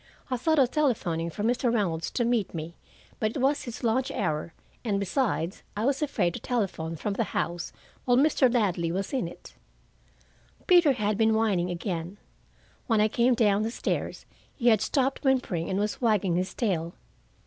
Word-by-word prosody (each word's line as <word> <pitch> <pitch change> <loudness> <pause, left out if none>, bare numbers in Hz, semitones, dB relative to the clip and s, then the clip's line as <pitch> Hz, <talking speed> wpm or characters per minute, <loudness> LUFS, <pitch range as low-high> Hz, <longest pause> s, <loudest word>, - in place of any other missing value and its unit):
I - - +2
thought 315 +6 +1
of 260 -3 +4
telephoning 180 - 0
for 170 +6 -5
Mr. 240 +1 +1
Reynolds 175 -8 0
to 240 - -1
meet 230 -7 0
me, 160 +1 -5 0.5
but 215 - +1
it - - -1
was 275 +2 +1
his 240 +1 -7
lunch 245 +3 +1
hour, 160 -3 -2 0.3
and 205 -4 0
besides 200 - -1 0.2
I 215 - 0
was 275 +2 +1
afraid 205 - 0
to - - -5
telephone 190 -9 -2
from 200 +6 -3
the 230 - 0
house 170 0 -2 0.3
while 245 -1 +4
Mr. 275 -3 +4
Ladley 180 -8 +1
was 195 +6 -3
in 255 -10 0
it. 170 - -12 1.1
Peter 345 -6 +6
had 210 -3 -1
been 220 0 +4
whining 200 -6 +1
again. 175 0 -4 0.7
When 225 -4 +3
I 215 +1 +4
came 240 +3 +3
down 210 -3 +3
the 220 - 0
stairs 230 - -3 0.3
he 245 -2 +3
had 220 -3 +4
stopped 270 -1 0
whimpering 250 - +1
and 190 - -1
was 210 +4 -2
wagging 210 -7 +2
his 185 +1 -2
tail. 170 -7 -1
215 Hz, 180 wpm, -27 LUFS, 175-250 Hz, 1.1 s, Peter